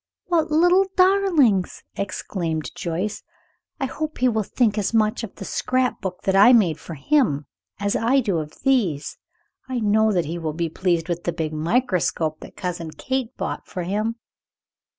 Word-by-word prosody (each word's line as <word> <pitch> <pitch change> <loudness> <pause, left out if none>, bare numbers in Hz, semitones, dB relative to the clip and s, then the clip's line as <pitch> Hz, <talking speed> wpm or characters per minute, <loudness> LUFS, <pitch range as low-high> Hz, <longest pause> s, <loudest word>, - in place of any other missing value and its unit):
"What 335 -3 +1
little 355 +5 +4
darlings!" 365 - +3
exclaimed 170 -5 -3
Joyce. 180 +5 -3 0.6
"I 270 - 0
hope 310 +3 -4
he 255 - +3
will 220 -2 0
think 215 0 +1
as 210 +3 -1
much 215 +1 +2
of 215 - -7
the 195 - -8
scrap 255 +4 0
book 185 -2 -5
that 195 -1 +1
I 205 +6 +8
made 185 -10 +3
for 165 - -8
him 150 - +1 0.3
as 200 0 0
I 245 +5 +3
do 200 -9 0
of 150 -1 -8
these. 205 - +1 0.5
I 255 -1 -1
know 220 0 +3
that 180 -4 +1
he 165 +3 -4
will 160 -2 -3
be 165 +1 -2
pleased 170 0 0
with 175 -1 -3
the 175 - +1
big 155 -2 -3
microscope 165 -3 0
that - - -12
Cousin 175 -3 -4
Kate 260 - -3
bought - - -4
for 180 - -5
him." 210 +5 -1
205 Hz, 170 wpm, -23 LUFS, 170-255 Hz, 0.6 s, I